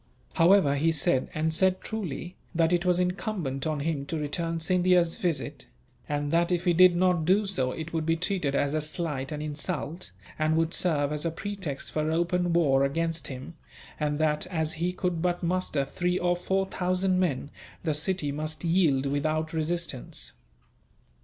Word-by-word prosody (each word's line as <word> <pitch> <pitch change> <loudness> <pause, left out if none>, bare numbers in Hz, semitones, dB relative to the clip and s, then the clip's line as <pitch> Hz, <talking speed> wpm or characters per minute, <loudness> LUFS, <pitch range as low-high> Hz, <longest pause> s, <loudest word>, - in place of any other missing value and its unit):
However, 165 -5 +5
he 160 +4 +3
said, 135 -4 +1
and 160 +1 0
said 185 +2 +2
truly, 180 -4 -5 0.2
that 165 +1 +3
it 175 +1 +1
was 180 0 +3
incumbent 180 - -2
on 155 -2 -1
him 145 -2 -2
to 165 - -2
return 165 +3 -2
Scindia's 180 0 +3
visit; 170 - -2 0.4
and 145 0 -1
that 170 +1 +2
if 175 0 0
he 175 - +4
did 180 +1 +7
not 180 -2 +2
do 195 +6 +3
so 135 -10 0
it 160 +3 -6
would 160 -1 0
be 165 +1 +2
treated 175 -5 -1
as 145 +1 +1
a 155 - +1
slight 150 -3 -3
and 150 0 -4
insult, 155 - -4 0.3
and 155 +1 +2
would 165 0 +1
serve 150 -4 +1
as 150 - -3
a 165 - +1
pretext 185 -4 -5
for 155 0 0
open 175 +1 +1
war 140 -6 +3
against 165 +3 -1
him; 135 +4 -7 0.5
and 150 -1 0
that, 150 +1 +1
as 160 -3 -1
he 175 +3 -1
could 180 -2 -2
but 175 0 0
muster 170 -5 0
three 180 +5 -1
or 175 0 +1
four 190 +2 0
thousand 185 0 0
men, 145 -5 -1 0.3
the 160 -3 +1
city 155 0 0
must 155 +3 -4
yield 165 -6 +3
without 155 +3 -1
resistance. 160 - -3
165 Hz, 175 wpm, -27 LUFS, 150-180 Hz, 0.5 s, did